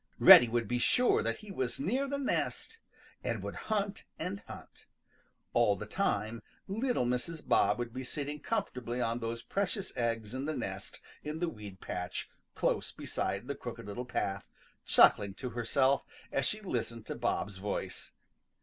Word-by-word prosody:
Reddy 120 - +11
would 115 0 0
be 125 0 0
sure 250 - +4
then 115 +1 0
that - - -13
he 210 - -9
was 130 -9 -2
near 250 - 0
the 280 +1 -1
nest 280 +10 -1 0.4
and - - -2
would - - -4 0.2
hunt 205 -2 0
and 185 +5 -3
hunt. - - -11 0.7
All - - +4
the - - -6
time 110 +3 -1 0.3
little 225 - 0
Mrs. 125 +7 -2
Bob - - +4
would 120 -1 -4
be 130 +1 -4
sitting 145 +3 -4
comfortably 125 - -2
on 115 -1 0
those 115 0 -4
precious 200 0 -2
eggs 115 -2 -1
in 130 +2 -3
the 155 0 -2
nest - - -5 0.2
in 150 +1 -3
the 175 +1 0
weed 105 - -10
patch 90 0 -4 0.3
close - - 0
beside - - -3
the - - -1
Crooked - - -7
Little 105 +5 -5
Path, 100 -5 -2 0.4
chuckling 100 -2 +6
to 125 +1 -5
herself 125 +4 +2 0.3
as 135 - +1
she 215 - -2
listened 115 - -3
to - - -3
Bob's 100 -2 -1
voice. 100 +2 -4
125 Hz, 170 wpm, -32 LUFS, 115-185 Hz, 0.7 s, Reddy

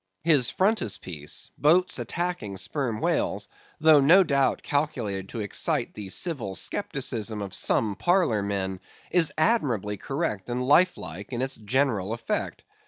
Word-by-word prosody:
His 145 -7 +4
frontispiece, 100 - -2
boats 175 +5 +3
attacking 170 - -3
Sperm 115 +3 -3
Whales, - - 0 0.3
though 155 -1 +6
no 175 +8 +7
doubt 140 -5 +1
calculated 115 -10 -2
to 115 - -5
excite 100 - -1
the 100 -2 -8
civil 115 - -1
scepticism 110 +5 -2
of 100 -2 -6
some 105 +1 0
parlor 175 - +2
men, 95 -2 -2 0.3
is 170 -3 +3
admirably 125 - +1
correct 135 - -3
and 125 +1 -2
life 180 +6 +5
like 90 - -8
in 120 +1 -1
its 135 0 -1
general 110 -3 0
effect. 115 0 -3
120 Hz, 135 wpm, -26 LUFS, 100-155 Hz, 0.3 s, no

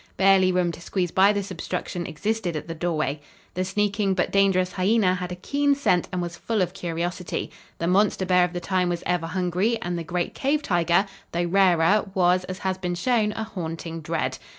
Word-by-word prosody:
Barely 190 -1 +5
room 180 -1 +1
to 170 - -11
squeeze 180 -1 -2
by 195 +2 +5
this 200 -1 -3
obstruction 175 0 -4
existed 205 0 -2
at 155 - -5
the 165 - -4
doorway. 155 -3 -2 0.3
The 185 - -1
sneaking 200 0 0
but 180 - 0
dangerous 190 -2 +3
hyena 195 0 +2
had 180 -1 -4
a - - -3
keen 285 +9 +1
scent 180 -11 +1
and 180 -1 -2
was 170 0 -5
full 215 +2 0
of 180 0 -4
curiosity. 175 -1 -3 0.3
The 170 - -2
monster 190 +1 +2
bear 180 0 +4
of 180 0 -1
the 175 - -2
time 180 0 0
was 175 -1 -3
ever 175 -2 0
hungry 185 +6 0
and 175 0 -3
the - - -4
great 175 +1 -2
cave 290 +3 0
tiger, 175 - +2 0.3
though 170 +1 0
rarer, 190 +2 +3
was, 180 0 +3
as 185 0 -6
has 190 -1 -2
been 180 -1 -2
shown, 215 +2 +1
a 220 - -3
haunting 165 -5 -6
dread. 160 +1 -2
180 Hz, 200 wpm, -24 LUFS, 175-195 Hz, 0.3 s, Barely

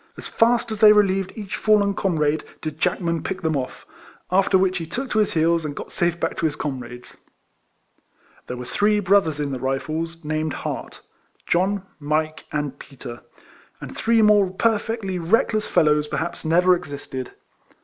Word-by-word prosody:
As - - -9
fast 235 0 +2
as 215 - -4
they 215 -1 +8
relieved 195 -2 +2
each 210 -1 -5
fallen 210 -2 +3
comrade 155 -6 0 0.2
did 155 -1 -6
Jack 180 +2 0
man 170 -2 -1
pick 190 0 -5
them 160 -1 +1
off; 130 -2 -4 0.5
after 190 +1 +4
which 185 0 +1
he 165 - -6
took 260 +10 -4
to 215 - +2
his 210 - +1
heels, 165 +1 +2
and 145 -2 -4
got - - -8
safe 175 -1 0
back 165 - -1
to 165 - +1
his 150 - -4
com 140 -4 -3
rades. 125 0 -11 1.3
There 125 - -5
were 125 - -6
three 210 +8 +2
brothers 190 -6 +2
in 145 -1 -2
the 130 - -3
Rifles, 155 +5 -3
named 155 0 -1
Hart, - - -6 0.2
— - - -39
John, 190 +3 +1 0.2
Mike, 155 +1 -1
and 145 -2 -3
Peter, 120 -3 -10 0.3
— - - -28
and - - -9
three 225 0 +3
more 205 -2 +5
perfectly 210 -1 -1
reckless 215 +4 +1
fellows, 150 -1 +3
per - - -3
haps, 170 +1 -4
never 175 +3 +4
existed. 140 -5 -7
170 Hz, 180 wpm, -23 LUFS, 150-200 Hz, 1.3 s, they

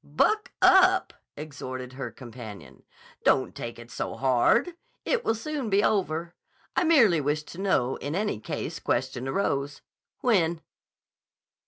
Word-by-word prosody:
"Buck 425 - +1
up!" 375 0 +5 0.2
exhorted 130 -4 -7
her 135 +1 -5
companion. 115 -5 -11 0.4
"Don't - - +3
take 115 - -6
it 120 0 -12
so - - -4
hard. 135 - +2 0.3
It - - 0
will 225 - +1
soon 275 +1 -4
be 200 +1 +3
over. 170 -4 0 0.4
I - - +3
merely 230 - +5
wished 150 +2 -1
to 175 - -9
know, 135 -10 +1
in 145 +2 -5 0.3
case - - -4
any - - -13
question 130 -1 -1
arose. 140 -3 -1 0.4
When?" 170 -9 +2
155 Hz, 135 wpm, -27 LUFS, 130-215 Hz, 0.4 s, up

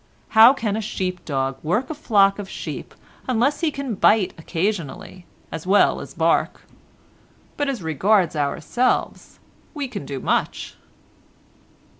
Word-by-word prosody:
How 225 +3 +8
can 225 -7 -2
a 220 - -2
sheep 185 -3 -4
dog 135 -2 -2
work 215 - -1
a - - -2
flock 205 -9 +3
of 195 -2 -6
sheep - - -7 0.3
unless 255 +3 +1
he 330 - +1
can 280 -4 -4
bite 205 0 +3
occasionally 175 0 -4 0.2
as 160 +2 -6
well 200 +2 +3
as - - -10
bark? - - +1 0.9
But 290 -1 -1
as 245 -9 -4
regards 175 +3 +2
ourselves 150 - -1 0.4
we 285 -2 -3
can 250 - -6
do 135 -2 -4
much." - - -1
205 Hz, 135 wpm, -22 LUFS, 165-250 Hz, 0.9 s, How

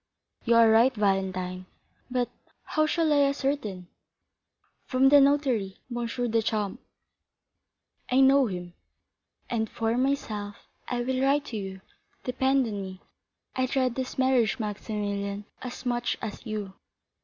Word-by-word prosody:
"You 235 -1 +4
are 230 -1 +7
right, 230 +4 +6
Valentine; 185 -3 -1 0.4
but 250 -1 -1 0.3
how 310 0 +1
shall 320 -1 +2
I 285 -1 +5
ascertain?" 270 -10 -2 1.0
"From 265 +1 +4
the 285 0 +8
notary, 265 -9 +2 0.2
M. 240 -1 -2 0.2
Deschamps." 220 0 0 1.3
"I 255 - +3
know 270 0 +6
him." 180 -3 -6 0.7
"And 220 -3 -1
for 225 0 -1
myself—I 240 -2 -3
will 260 +1 -1
write 280 +2 +2
to - - -1
you, 190 -1 -6 0.4
depend 265 +1 +2
on 205 -3 -4
me. 190 -1 -8 0.5
I 255 0 +1
dread 255 -1 +1
this 260 +1 -4
marriage, 260 -4 +3
Maximilian, 205 -2 -3 0.2
as 255 0 -7
much 240 0 0
as 220 +2 -6
you." 210 -3 -4
235 Hz, 125 wpm, -27 LUFS, 205-265 Hz, 1.3 s, the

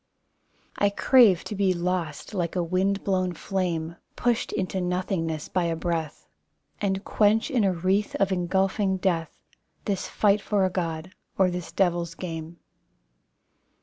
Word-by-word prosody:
I 205 - +3
crave 205 -3 +5
to - - -6
be 195 -2 +2
lost 175 -2 -3
like 175 -3 -2
a 180 - +1
wind 190 +3 0
blown 185 -2 0
flame. 170 -2 -2 0.2
Pushed 240 -2 0
into 190 -1 -2
nothingness 180 -3 -2
by 180 -2 0
a 165 -1 0
breath, 165 -2 -3 0.5
And 195 -1 0
quench 220 +6 +2
in 245 -5 +2
a 195 - +3
wreath 185 +4 0
Of 195 0 +1
engulfing 190 +2 +1
death 175 -4 -1 0.5
This 195 -3 -1
fight 210 -1 +2
for 200 -1 +1
a 185 - 0
God, 170 0 -3 0.2
or 190 -2 +4
this 180 -1 -5
devil's 175 -3 0
game. 165 -1 -6
185 Hz, 145 wpm, -26 LUFS, 170-195 Hz, 0.5 s, crave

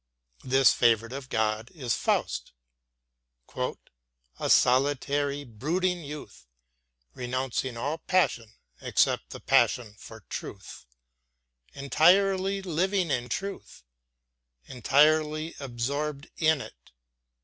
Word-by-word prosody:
This 135 +1 +4
favorite 115 0 +2
of 135 -1 -7
God 110 +1 -1
is 125 -7 -2
Faust, - - -1 1.0
"a - - -7
solitary, 140 +2 +2
brooding 170 - -2
youth, 145 - -10 0.7
renouncing 130 0 -3
all 145 +7 -3
passion 120 - 0 0.3
except - - +1
the - - -8
passion 115 -4 +2
for 110 -1 -12
truth, 95 -10 -9 0.9
entirely 190 +7 +3
living 185 0 0
in 125 -2 -1
truth, 195 - -6 0.8
entirely 155 - +2
absorbed 140 +4 -4
in 155 -3 +2
it." - - -13
140 Hz, 90 wpm, -27 LUFS, 120-155 Hz, 1.0 s, This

